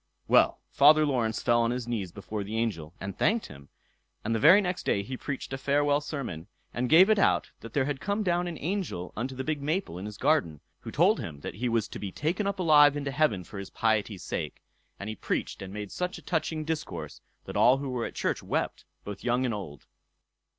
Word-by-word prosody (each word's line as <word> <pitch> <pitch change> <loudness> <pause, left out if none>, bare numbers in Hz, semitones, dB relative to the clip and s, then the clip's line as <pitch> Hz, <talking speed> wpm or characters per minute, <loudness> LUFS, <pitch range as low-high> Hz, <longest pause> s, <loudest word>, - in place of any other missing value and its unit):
Well, - - +4
Father 155 +2 +6
Laurence 120 -6 0
fell 120 -1 +4
on 115 - +2
his 125 -1 -3
knees 105 -7 -3
before 105 +2 -5
the 105 +3 -4
angel, 90 -8 -2
and 100 -1 -5
thanked 225 +1 +1
him; 70 0 -12 0.6
and 115 - 0
the 115 - +1
very 170 - +8
next 180 -2 -2
day 100 - +1
he 130 +6 -5
preached 135 0 -5
a 135 - -3
farewell 145 +1 +2
sermon, 135 - -5 0.3
and 125 +1 -1
gave 175 +5 +8
it 215 -1 +3
out - - +2
how 115 - -8
there 130 +3 0
had 140 -2 -3
come 205 +2 -1
down 175 -1 +1
an 170 -2 -5
angel 165 - -3
unto 130 +5 -3
the 130 - -3
big 150 0 -2
maple 155 - -2
in 100 - -5
his 105 -1 -8
garden, 130 - +1 0.2
who - - -15
had - - -6
told - - +4
him 75 -4 -7
that - - -5
he 120 +6 -2
was 115 -2 +1
to - - -7
be 100 -2 -5
taken 175 - -1
up 200 - -1
alive 150 -5 +6
into 140 -1 -3
heaven 130 -10 +1
for 100 - -9
his 100 - -7
piety's 110 -4 0
sake; - - -4 0.4
and 100 - -6
he 110 - -4
preached - - -3
and 95 -1 -7
made 105 -1 -6
such 180 0 -3
a - - -13
touching 160 -2 -2
discourse, 160 -1 -5 0.2
that - - -7
all 125 +2 +5
who 140 0 -4
were 120 -2 -2
at - - -11
church - - -1
wept, - - -2 0.2
both 105 -1 -7
young 125 +1 +1
and 120 - 0
old. 85 -9 -7
125 Hz, 230 wpm, -28 LUFS, 105-155 Hz, 0.6 s, very